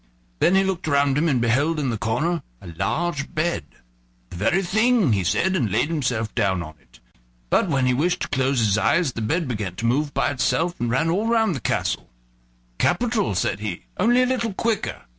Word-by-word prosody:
Then 180 Hz, -, +4 dB
he 195 Hz, -, +4 dB
looked 190 Hz, -4 st, -2 dB
around 140 Hz, -2 st, +2 dB
him 160 Hz, +3 st, +2 dB
and 130 Hz, -4 st, +2 dB
beheld 140 Hz, +7 st, +1 dB
in 135 Hz, -4 st, -1 dB
the -, -, -2 dB
corner 150 Hz, +10 st, -1 dB, 0.2 s
a 90 Hz, -, -11 dB
large 155 Hz, -, -2 dB
bed. 155 Hz, -, -1 dB, 0.7 s
"The -, -, -8 dB
very 175 Hz, -, +1 dB
thing," 220 Hz, -, +2 dB
he 95 Hz, -2 st, +1 dB
said, 190 Hz, -, +1 dB
and 115 Hz, -, 0 dB
laid 150 Hz, -, +1 dB
himself 125 Hz, -9 st, -1 dB
down 95 Hz, -3 st, 0 dB
in 75 Hz, -, -8 dB
it. -, -, -23 dB, 0.5 s
But 190 Hz, -, +2 dB
when 135 Hz, -4 st, +1 dB
he 125 Hz, -, +2 dB
wished 170 Hz, +8 st, 0 dB
to -, -, -3 dB
close 135 Hz, 0 st, 0 dB
his 105 Hz, -1 st, +2 dB
eyes 160 Hz, +3 st, +2 dB
the 115 Hz, -, -5 dB
bed 160 Hz, +8 st, -1 dB
began 105 Hz, -7 st, -4 dB
to 115 Hz, -, -4 dB
move 140 Hz, +5 st, +1 dB
by -, -, 0 dB
itself, 160 Hz, +6 st, 0 dB
and 120 Hz, -, -1 dB
ran 165 Hz, +7 st, +1 dB
all 205 Hz, +6 st, 0 dB
round 225 Hz, -4 st, +2 dB
the -, -, -4 dB
castle. -, -, -2 dB, 0.7 s
"Capital," 220 Hz, +2 st, +1 dB
he 100 Hz, -, -2 dB
said, 95 Hz, +1 st, -2 dB, 0.2 s
"only 240 Hz, +6 st, +4 dB
a -, -, +3 dB
little 235 Hz, -5 st, -1 dB
quicker." 225 Hz, 0 st, -2 dB
145 Hz, 205 wpm, -23 LUFS, 115-180 Hz, 0.7 s, Then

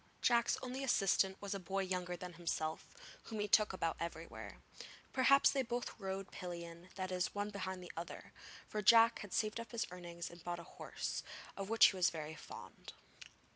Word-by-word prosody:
Jack's 235 Hz, -1 st, +4 dB
only 260 Hz, +2 st, -3 dB
assistant 195 Hz, -5 st, +3 dB
was 200 Hz, 0 st, -3 dB
a 195 Hz, -, -3 dB
boy 190 Hz, +2 st, -1 dB
younger 180 Hz, -1 st, -2 dB
than 180 Hz, +1 st, -7 dB
himself, 165 Hz, -2 st, -2 dB, 0.4 s
whom 220 Hz, -2 st, -5 dB
he 205 Hz, -, 0 dB
took 210 Hz, +1 st, +5 dB
about 165 Hz, -3 st, -1 dB
everywhere. 165 Hz, -1 st, -6 dB, 0.6 s
Perhaps 275 Hz, +1 st, +6 dB
they 275 Hz, -, +1 dB
both 240 Hz, -1 st, -3 dB
rode 195 Hz, -1 st, -4 dB
pillion 170 Hz, -1 st, -7 dB
that 185 Hz, -1 st, -3 dB
is, 180 Hz, +1 st, -1 dB
one 205 Hz, +1 st, -1 dB
behind 190 Hz, -2 st, -4 dB
the 180 Hz, -, -8 dB
other; 170 Hz, +1 st, -7 dB, 0.3 s
for 210 Hz, -, -2 dB
Jack 230 Hz, +2 st, +7 dB
had 205 Hz, -, -8 dB
saved 215 Hz, +2 st, 0 dB
up 230 Hz, -2 st, -7 dB
his 230 Hz, -, 0 dB
earnings 170 Hz, -1 st, -6 dB
and 175 Hz, -1 st, -13 dB
bought 175 Hz, 0 st, -2 dB
a 170 Hz, -, -8 dB
horse, -, -, -4 dB, 0.3 s
of 195 Hz, 0 st, -4 dB
which 225 Hz, 0 st, +8 dB
he -, -, -8 dB
was 180 Hz, -1 st, +4 dB
very 155 Hz, -1 st, -5 dB
fond. 155 Hz, -, -10 dB
190 Hz, 185 wpm, -37 LUFS, 175-215 Hz, 0.6 s, which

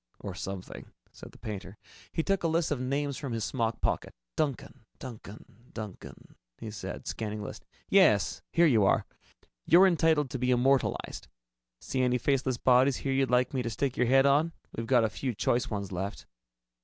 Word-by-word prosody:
"Or 100 Hz, -, -6 dB
something," 95 Hz, +1 st, -7 dB, 0.2 s
said -, -, -12 dB
the -, -, -16 dB
painter. 100 Hz, -2 st, -7 dB, 0.3 s
He 165 Hz, -, -1 dB
took 195 Hz, +1 st, +1 dB
a 170 Hz, -, +1 dB
list 165 Hz, 0 st, 0 dB
of 140 Hz, -4 st, -1 dB
names 140 Hz, +1 st, -1 dB
from 140 Hz, -4 st, -5 dB
his 115 Hz, -1 st, -2 dB
smock 115 Hz, -3 st, -2 dB
pocket. -, -, -1 dB, 0.2 s
"Duncan, 140 Hz, -6 st, -3 dB
Duncan, 110 Hz, -4 st, -10 dB, 0.3 s
Duncan," 105 Hz, -4 st, -9 dB, 0.2 s
he 110 Hz, -, -7 dB
said, 105 Hz, -, -7 dB
scanning 105 Hz, -1 st, -4 dB
the -, -, -6 dB
list. -, -, -9 dB, 0.2 s
"Yes -, -, +4 dB
here 170 Hz, -, +4 dB
you 115 Hz, -9 st, +4 dB
are. -, -, +3 dB, 0.6 s
You're 180 Hz, +4 st, +7 dB
entitled 160 Hz, -6 st, +2 dB
to 130 Hz, -, -3 dB
be 125 Hz, +1 st, 0 dB
immortalized. 130 Hz, +1 st, +1 dB, 0.5 s
See 130 Hz, -, -2 dB
any 125 Hz, 0 st, +2 dB
faceless 130 Hz, 0 st, 0 dB
body 130 Hz, +2 st, +5 dB
here 135 Hz, 0 st, -2 dB
you'd 135 Hz, 0 st, +1 dB
like 125 Hz, +1 st, +2 dB
me 130 Hz, -, 0 dB
to 120 Hz, -, -2 dB
stick 130 Hz, +3 st, -2 dB
your 125 Hz, -, +1 dB
head 135 Hz, +2 st, +5 dB
on? 150 Hz, +4 st, +3 dB, 0.2 s
We've 115 Hz, 0 st, -4 dB
got 125 Hz, -2 st, +4 dB
a -, -, +3 dB
few 115 Hz, +3 st, -4 dB
choice 120 Hz, +6 st, 0 dB
ones 100 Hz, -3 st, -4 dB
left." 95 Hz, +3 st, -4 dB
125 Hz, 185 wpm, -29 LUFS, 110-140 Hz, 0.6 s, You're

